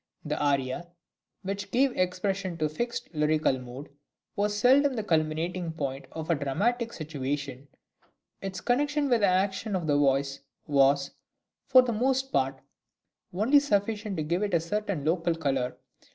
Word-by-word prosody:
The 150 0 -2
aria, 140 +3 0 0.6
which 200 +1 -4
gave 260 +4 +3
expression 185 0 -1
to 155 - 0
a - - 0
fixed 235 +5 -4
lyrical 150 -3 +2
mood, 125 +3 -9 0.5
was 205 0 0
seldom 265 +4 +4
the 220 - -2
culminating 165 0 -1
point 140 -3 -4
of 160 +1 -4
a - - +4
dramatic 225 - 0
situation; 140 - -4 0.7
its 190 -1 -5
connection 290 +3 +1
with 240 -3 +3
the 200 - +5
action 190 +3 0
of 180 -3 -2
the 150 - +2 0.2
piece 140 0 -3 0.3
was, 140 -1 +3 0.6
for 255 -2 +7
the 240 -2 -1
most 265 +4 +1
{OPERA 135 - +4
SERIA.} 135 - -24 0.7
(162) 180 - -8
part, - - +3
only 280 +6 +6
sufficient 210 -6 -1
to 155 - -1
give 170 +5 -1
it 205 -4 0
a - - +4
certain 185 -2 -3
local 165 +1 +1
colour. 135 -5 -1
175 Hz, 165 wpm, -28 LUFS, 145-210 Hz, 0.7 s, for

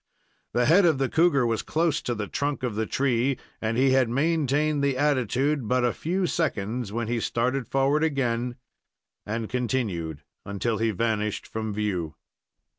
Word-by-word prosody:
The 120 0 +2
head 170 +9 +6
of 165 -5 +4
the 135 -1 0
cougar 160 -6 +3
was 115 -2 0
close 165 -1 0
to 120 - -2
the 105 -1 -3
trunk 140 +4 -2
of 125 -3 -1
the 110 +1 -2
tree, 130 -1 +1 0.2
and 115 +1 -1
he 130 +1 +4
had 130 -3 +3
maintained 150 +1 +1
the 140 -2 +1
attitude 140 0 +1
hut 125 0 +2
a 120 - +1
few 180 +4 -1
seconds 120 - -1
when 115 +1 -2
he 120 0 0
started 125 +3 -1
forward 135 +3 +2
again 125 -5 0 0.7
and 110 +1 -2
continued 105 - -2 0.2
until 105 +3 -2
he 115 0 +2
vanished 110 0 -1
from 110 -1 -4
view. 95 -7 -2
125 Hz, 165 wpm, -26 LUFS, 110-140 Hz, 0.7 s, head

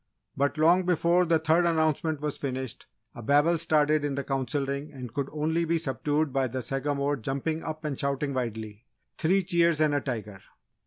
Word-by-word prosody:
But 140 +2 0
long 170 +4 +5
before 175 0 +3
the 165 -1 +4
third 160 +2 +2
announcement 160 -2 +1
was 150 -1 -3
finished 130 -3 -5 0.3
a - - -9
babel 145 +7 +3
started 155 -2 +3
in 145 -2 -1
the 140 - -2
Council 135 +1 -1
Ring 140 +2 -4
and 125 -5 -8
could 140 +1 -2
only 160 +2 0
be 165 0 +1
subdued 150 -1 -1
by 135 -1 +1
the 130 +1 -4
Sagamore 140 +3 -1
jumping 140 +6 -3
up 155 0 -6
and 145 -3 -3
shouting 140 0 -1
wildly: 110 -2 -5 0.3
"Three 185 +4 +2
cheers 170 -3 +2
and 155 -1 +3
a 145 - +1
tiger!" 105 -7 -5
145 Hz, 180 wpm, -27 LUFS, 135-160 Hz, 0.3 s, long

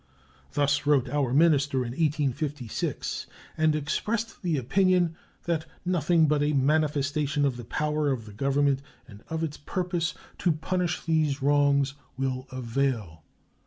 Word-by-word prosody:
Thus 145 0 +1
wrote 140 -4 +4
our 140 -2 0
minister 145 -2 +3
in 120 - -4
1856, 145 -3 -2 0.3
and 155 -1 +3
expressed 210 +10 -2
the 170 -5 0
opinion 175 +5 +2 0.3
that 165 -2 -1 0.2
"nothing 170 -2 +3
but 150 0 +2
a 150 +1 +2
manifestation 145 0 +1
of 135 -3 0
the 120 -1 -8
power 150 +3 0
of 125 -5 -2
the 105 - -11
Government 140 +4 +1 0.3
and 105 -3 -14
of 160 0 -3
its 150 -2 -3
purpose 175 0 -2 0.2
to 175 -3 +2
punish 180 +2 -2
these 155 -4 +1
wrongs 140 -1 +3 0.2
will 130 0 -2
avail." 120 - -2
145 Hz, 135 wpm, -27 LUFS, 135-160 Hz, 0.3 s, wrote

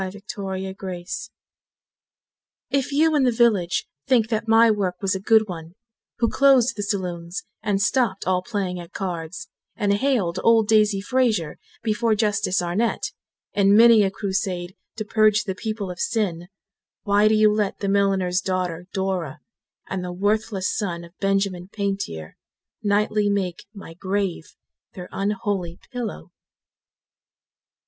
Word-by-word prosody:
D. 200 +2 -11 0.2
Blood 190 -1 -4 2.0
If 275 0 0
you 310 +2 +3
in 290 - +3
the 255 -2 +3
village 220 -7 +2 0.2
think 230 -4 +3
that 225 0 -1
my 225 0 +6
work 195 -4 -1
was 195 -1 0
a 190 - -2
good 220 +2 +4
one, 170 -1 -8 0.4
Who 235 - +2
closed 265 -1 +4
the 205 - -4
saloons 180 -3 -3 0.2
and 200 -2 0
stopped 225 -1 +1
all 185 -1 +1
playing 190 -3 -3
at 175 +1 -11
cards, 175 -2 -5 0.3
And 205 -3 +1
haled 200 -7 +1
old 225 -2 +5
Daisy 210 -2 +3
Fraser 215 -8 0 0.2
before 220 0 +1
Justice 205 -4 +1
Arnett, 190 +7 -1 0.4
In 200 0 +4
many 230 -1 +8
a 195 - +3
crusade 190 -2 -3 0.2
to 215 - -4
purge 215 0 +3
the 195 -2 -3
people 210 -1 -4
of 180 - -9
sin; 175 -6 -1 0.6
Why 205 +1 +4
do 215 - +4
you 215 0 +5
let 210 -2 -1
the 200 - -3
milliner's 195 -2 +2
daughter 180 -2 -2
Dora, 185 -5 -2 0.5
And 190 -1 -3
the 180 - -4
worthless 205 +1 0
son 175 -5 -3
of 170 0 -14
Benjamin 195 -2 0
Pantier 195 - -4 0.4
Nightly 210 0 +1
make 190 -4 -2
my 200 -6 -11
grave 190 -1 -3 0.4
their 180 -1 -9
unholy 195 -3 -2
pillow? 235 -7 -5
200 Hz, 140 wpm, -23 LUFS, 180-215 Hz, 2.0 s, many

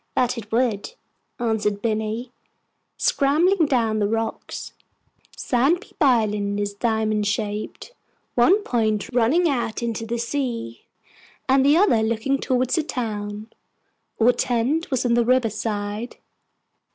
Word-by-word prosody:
"That 250 0 +1
it 220 -3 -8
would," 240 - 0 0.4
answered 220 -4 0
Binny, 220 +2 -2 0.7
scrambling 320 +5 +2
down 230 -5 +1
the 205 - +2
rocks. 225 +1 -4 0.6
Sandpeep 275 +10 0
Island 210 -6 +2
is 205 0 -2
diamond 215 -1 0
shaped 210 - -3 0.4
one 370 - +4
point 220 - 0
running 255 +9 +3
out 240 -5 -1
into 230 -1 -3
the 235 +1 -2
sea, 235 - -4 0.6
and 265 0 +4
the 290 +3 +5
other 350 - +4
looking 230 +5 0
towards 255 -1 0
the 325 - +2
town. 215 -5 -4 0.7
Our 235 +2 +6
tent 250 +6 0
was 260 -2 0
on 240 - +2
the 240 0 +3
river 245 -2 +2
side. 210 +1 -4
230 Hz, 125 wpm, -23 LUFS, 215-260 Hz, 0.7 s, Our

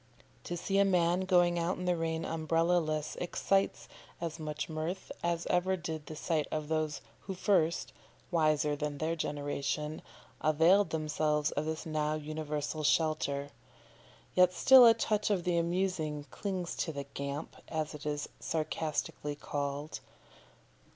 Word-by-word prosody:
To 175 - -3
see 195 +3 0
a - - +7
man 180 -1 +2
going 175 -2 +4
out 170 +2 0
in 180 - -4
the 180 0 +2
rain 165 -1 -2
umbrella 165 +2 +2
less 155 -2 -2
excites 195 +2 0 0.3
as 165 -1 -4
much 155 -1 -4
mirth 160 +4 -4
as 170 0 0
ever 185 +1 +2
did 160 -3 -5
the 155 - -6
sight 155 -1 0
of 155 -1 -3
those 155 -1 -1 0.2
who 190 - -6
first 175 -4 +1 0.4
wiser 155 -3 +2
than 145 0 -3
their 160 +3 -1
generation 145 0 -2 0.4
availed 165 +5 +4
themselves 155 -1 0
of 145 - -2
this 160 0 -3
now 155 -1 0
universal 155 0 -3
shelter. 145 -2 +1 0.8
Yet 180 0 +5
still 260 +4 +8
a 225 - +7
touch 215 -2 0
of 195 -4 +1
the 175 -1 +2
amusing 170 -4 -1
clings 185 -4 -3
to 165 - -1
the 140 -2 -4
"Gamp," 140 +2 -5
as 155 -1 -2
it 150 - -9
is 145 -1 -2
sarcastically 155 -2 -2
called. 145 +1 -4
160 Hz, 145 wpm, -32 LUFS, 150-175 Hz, 0.8 s, still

